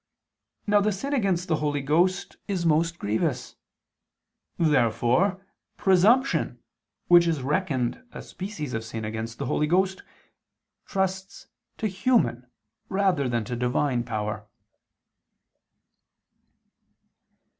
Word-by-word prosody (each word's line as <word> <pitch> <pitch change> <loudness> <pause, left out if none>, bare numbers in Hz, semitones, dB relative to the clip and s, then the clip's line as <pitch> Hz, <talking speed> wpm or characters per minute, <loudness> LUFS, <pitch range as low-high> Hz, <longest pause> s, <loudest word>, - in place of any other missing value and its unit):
Now 205 -1 +4
the 210 +1 +2
sin 275 +9 -4
against 195 -9 0
the 160 - +1
Holy 145 -1 -1
Ghost 175 +6 +1
is 185 -4 -2
most 165 +2 +2
grievous. 105 -4 -2 1.0
Therefore 155 - +2 0.3
presumption, 215 +9 +3 0.5
which 175 -1 +6
is 155 -5 -1
reckoned 140 - -1
a - - -8
species 185 -8 -6
of 110 - -2
sin 110 -1 -6
against 110 +1 -5
the 140 - -4
Holy 150 +3 0
Ghost, 190 +3 +1 0.9
trusts 190 0 -3 0.3
to - - -3
human 190 - +1 0.4
rather 190 -9 +1
than 120 -2 0
to 120 - -4
Divine 125 +1 0
power. 105 -3 -4
165 Hz, 105 wpm, -26 LUFS, 125-190 Hz, 1.0 s, which